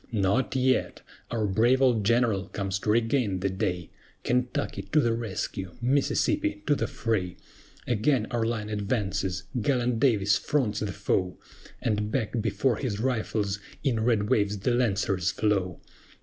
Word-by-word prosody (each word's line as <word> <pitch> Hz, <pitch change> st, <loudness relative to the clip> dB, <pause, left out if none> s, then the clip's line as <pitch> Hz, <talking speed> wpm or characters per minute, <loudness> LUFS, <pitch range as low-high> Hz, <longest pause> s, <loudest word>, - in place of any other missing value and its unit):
NOT 110 Hz, +5 st, +1 dB
YET! 130 Hz, 0 st, +1 dB, 0.3 s
Our 115 Hz, -2 st, -1 dB
brave 115 Hz, +6 st, +3 dB
old 125 Hz, -5 st, +3 dB
General 110 Hz, -3 st, +2 dB
comes 95 Hz, -1 st, -3 dB
to 105 Hz, -, -3 dB
regain 115 Hz, -3 st, +1 dB
the 95 Hz, 0 st, 0 dB
day; 90 Hz, -4 st, -2 dB, 0.3 s
KENTUCKY, 125 Hz, -5 st, -1 dB
to 155 Hz, -, +6 dB
the 120 Hz, -5 st, +2 dB
rescue! 95 Hz, -5 st, -4 dB
MISSISSIPPI, 300 Hz, -, +1 dB
to -, -, +3 dB
the -, -, -1 dB
fray! 115 Hz, -10 st, -2 dB, 0.5 s
Again 120 Hz, +1 st, +1 dB
our 120 Hz, -2 st, 0 dB
line 110 Hz, -2 st, -2 dB
advances! 100 Hz, -3 st, -1 dB, 0.2 s
Gallant 125 Hz, -1 st, +1 dB
DAVIS 105 Hz, -6 st, +3 dB
fronts 120 Hz, -8 st, 0 dB
the 105 Hz, -2 st, -2 dB
foe, 90 Hz, -2 st, -1 dB, 0.5 s
And 105 Hz, -1 st, 0 dB
back 115 Hz, -1 st, -1 dB
before 115 Hz, +1 st, +1 dB
his 110 Hz, -7 st, -3 dB
rifles, 110 Hz, -5 st, -1 dB, 0.2 s
in 130 Hz, -5 st, +1 dB
red 110 Hz, -2 st, +2 dB
waves 105 Hz, -1 st, +1 dB
the 105 Hz, +6 st, 0 dB
Lancers 100 Hz, -6 st, +1 dB
flow. 95 Hz, -5 st, 0 dB
110 Hz, 145 wpm, -27 LUFS, 100-125 Hz, 0.5 s, to